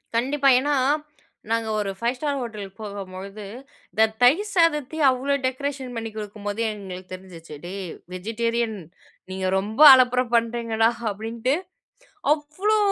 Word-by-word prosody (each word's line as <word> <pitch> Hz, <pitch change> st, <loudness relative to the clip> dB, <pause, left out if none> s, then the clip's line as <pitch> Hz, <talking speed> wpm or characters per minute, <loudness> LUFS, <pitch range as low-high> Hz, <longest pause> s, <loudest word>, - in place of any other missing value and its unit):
கண்டிப்பா. 275 Hz, +4 st, +2 dB
ஏன்னா, 290 Hz, +2 st, 0 dB, 0.8 s
நாங்க 230 Hz, -1 st, 0 dB
ஒரு 205 Hz, -2 st, -1 dB
ஃபைவ் 235 Hz, +2 st, -1 dB
ஸ்டார் 285 Hz, 0 st, -1 dB
ஹோட்டல் 215 Hz, -4 st, -6 dB
போகும்பொழுது, 200 Hz, 0 st, -7 dB, 0.5 s
இந்த 220 Hz, -, +4 dB, 0.2 s
தயிர் 335 Hz, +13 st, +4 dB
சாதத்தையும் 315 Hz, -3 st, +3 dB
அவ்வளோ 260 Hz, +2 st, -1 dB
டெக்கரேஷன் 265 Hz, -1 st, -3 dB
பண்ணிக் 225 Hz, -1 st, -5 dB
கொடுக்கும்போது 205 Hz, 0 st, -5 dB
எங்களுக்கு 190 Hz, -3 st, -9 dB
தெரிஞ்சிச்சு, 175 Hz, -4 st, -10 dB
"டேய்! 190 Hz, 0 st, -5 dB, 0.2 s
வெஜிடேரியன். 230 Hz, +3 st, -2 dB, 0.5 s
நீங்க 190 Hz, 0 st, -3 dB
ரொம்ப 215 Hz, +7 st, -2 dB
அலப்பர 250 Hz, -1 st, +4 dB
பண்ணுறீங்கடா" 230 Hz, -1 st, +2 dB, 0.2 s
அப்படின்ட்டு. 225 Hz, +5 st, -2 dB, 0.8 s
அவ்ளோ 310 Hz, +9 st, -1 dB
230 Hz, 115 wpm, -24 LUFS, 205-265 Hz, 0.8 s, இந்த